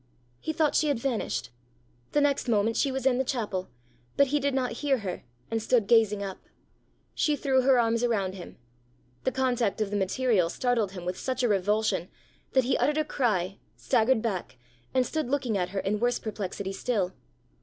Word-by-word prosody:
He 315 - -3
thought 315 -2 +1
she 310 - +3
had 285 -3 +1
vanished. 165 - -2 0.6
The 295 - +3
next 280 -2 +1
moment 220 0 +2
she 275 - +1
was 265 -1 -3
in 255 -1 +3
the - - +3
chapel, 210 -8 -2 0.5
but 280 - +6
he 295 +2 +2
did 280 -1 0
not 255 -2 0
hear 280 -2 +2
her, 195 -6 -5 0.3
and 225 0 0
stood 230 -1 +2
gazing 210 -2 +3
up. 195 -1 -5 0.7
She 300 - +1
threw 265 -2 +2
her 260 0 +4
arms 230 0 +2
around 200 -6 +1
him. 185 -2 -10 0.7
The 260 - +2
contact 250 -6 0
of 210 -2 -1
the - - -1
material 200 -2 +2
startled 230 -2 0
him 180 -2 -7
with 180 +1 -3
such 255 -1 -2
a - - +4
revulsion, 205 -2 +1 0.5
that 260 - +4
he 250 - +1
uttered 295 +1 +2
a 310 - +1
cry, 200 -10 0 0.2
staggered 240 -1 +2
back, 185 - -3 0.3
and 255 -1 +2
stood 310 -3 -2
looking 260 -5 0
at 180 -2 0
her 195 +1 -3
in 205 +2 -1
worse 245 +2 +1
perplexity 200 -2 -4
still. 195 -3 -1
230 Hz, 190 wpm, -28 LUFS, 200-260 Hz, 0.7 s, but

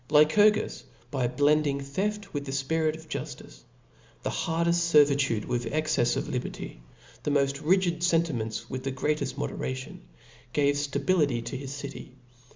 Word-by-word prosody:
Lycurgus, 155 +9 +4 0.3
by 130 -3 0
blending 145 +2 +2
theft 195 +9 -3
with 145 -1 -2
the 135 - -5
fpirit 155 +3 0
of 160 0 -14
juftice, - - -7 0.6
the - - -1
hardeft 165 +1 0 0.4
fcrvitude 135 -6 0
with 120 -1 -1
excefs 155 -6 +1
of - - -2
liberty, 125 - -5 0.4
the - - -2
moft 140 0 +1
rigid 175 0 +2
fen 170 -2 +4
timents 115 -7 -4
with 130 +1 -5
the 135 - -2
greateft 140 0 -1
moderation, 135 +8 -4 0.5
gave 145 -1 +3
ftability 145 -2 +1
to 120 - -4
his 135 0 -6
city. 140 0 -8
145 Hz, 145 wpm, -28 LUFS, 135-160 Hz, 0.6 s, Lycurgus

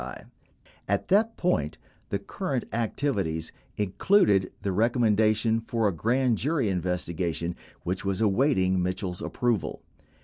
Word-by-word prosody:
18 - - -8 0.6
At - - 0
that 215 +4 +3
point, 75 - 0 0.3
the 100 - 0
"current 135 - -3
activities" 105 - -1 0.3
included 105 - +3
the 100 - 0
recom 115 +3 +3
mendation 110 +1 +2
for 115 -2 +1
a - - +2
grand 120 +5 +1
jury 140 -4 +1
investigation 85 -2 -2 0.3
which 90 +3 -2
was 95 -1 -1
awaiting 95 -4 +2
Mitchell's 90 0 -3
approval. 120 -6 -1
105 Hz, 125 wpm, -27 LUFS, 90-120 Hz, 0.6 s, that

